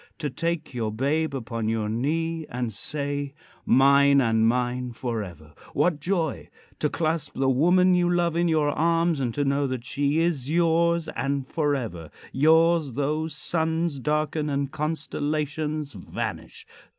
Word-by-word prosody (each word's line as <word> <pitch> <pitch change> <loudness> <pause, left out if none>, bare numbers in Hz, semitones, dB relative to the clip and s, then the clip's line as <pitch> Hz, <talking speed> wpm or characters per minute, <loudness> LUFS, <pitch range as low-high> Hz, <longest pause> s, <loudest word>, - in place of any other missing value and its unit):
To 150 -4 -3
take 165 0 -3
your 115 -3 -2
babe 140 +6 0
upon 115 -3 -3
your 110 -1 -1
knee 160 +8 -1
and 120 -2 -3
say: 145 +3 -2 0.3
"Mine 140 +1 +5
and 115 -3 +3
mine 125 +1 -1
forever!" 100 - -5 0.2
What 170 -4 +2
joy! 165 -2 -2 0.3
To 150 - +1
clasp 160 -2 -1
the 135 0 +1
woman 180 +7 +4
you 175 -1 +3
love 175 -2 +1
in 170 +1 +2
your 155 -3 +2
arms 165 0 +1
and 125 -3 -1
to 145 - 0
know 140 +1 +1
that 130 -2 -4
she 145 +3 0
is 160 -6 0
yours 170 0 +2
and 140 -1 -2
forever 125 - -2 0.2
yours 160 0 +3
though 150 +4 -1
suns 160 0 -1
darken 150 +2 -1
and 140 -1 -1
constellations 150 -1 -2
vanish! - - -6
145 Hz, 140 wpm, -25 LUFS, 130-160 Hz, 0.3 s, Mine